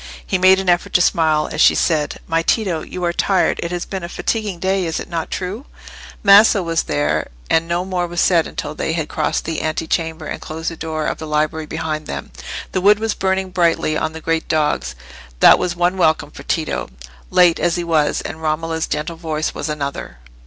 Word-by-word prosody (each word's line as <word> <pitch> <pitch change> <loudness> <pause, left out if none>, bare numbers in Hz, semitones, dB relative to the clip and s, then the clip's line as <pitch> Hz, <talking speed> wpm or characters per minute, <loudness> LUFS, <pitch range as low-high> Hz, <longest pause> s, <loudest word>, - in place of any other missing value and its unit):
He 190 - 0
made 190 +1 +6
an 190 - -4
effort 175 -1 +1
to 180 - +4
smile, 155 -3 +2
as 155 - -1
she - - +6
said— 150 -4 0
"My 165 0 +1
Tito, 180 -3 0
you 180 +3 -7
are 170 - 0
tired; 190 +1 +1
it 170 - -3
has 175 0 -3
been 190 -1 -5
a 170 - -5
fatiguing 210 -1 -2
day: 190 0 0
is 160 - -2
it - - -7
not 165 -1 -3
true?" 195 +8 -5 0.6
Maso 200 0 +7
was 165 -1 0
there, 75 +1 -1 0.2
and 165 +1 +3
no 175 +2 -1
more 180 -2 -1
was 175 0 -4
said 170 -2 +3
until 150 - -5
they 160 - -2
had 160 -2 -2
crossed - - -1
the 160 -1 -2
ante 155 +1 -2
chamber 160 -1 -2
and - - -5
closed 160 +2 -4
the - - -7
door 160 -1 -3
of - - -2
the 160 - -6
library 155 +1 -1
behind 155 -1 -4
them. - - -6 0.4
The 185 - -1
wood 205 +2 +6
was 220 0 -1
burning 190 0 -1
brightly 170 -3 +1
on 160 0 -1
the 160 - -8
great 165 0 -1
dogs; 155 -2 0 0.4
that - - +7
was 175 -1 -1
one 175 +2 +1
welcome 155 -4 +2
for - - -11
Tito, 160 -2 -2 0.4
late 175 -2 +4
as 170 - +1
he 175 - -2
was, 160 -3 +1
and 160 - -7
Romola's 160 +1 -1
gentle 155 +3 -3
voice 155 -2 -2
was 145 - -4
another. 140 - -4
165 Hz, 215 wpm, -19 LUFS, 155-180 Hz, 0.6 s, Maso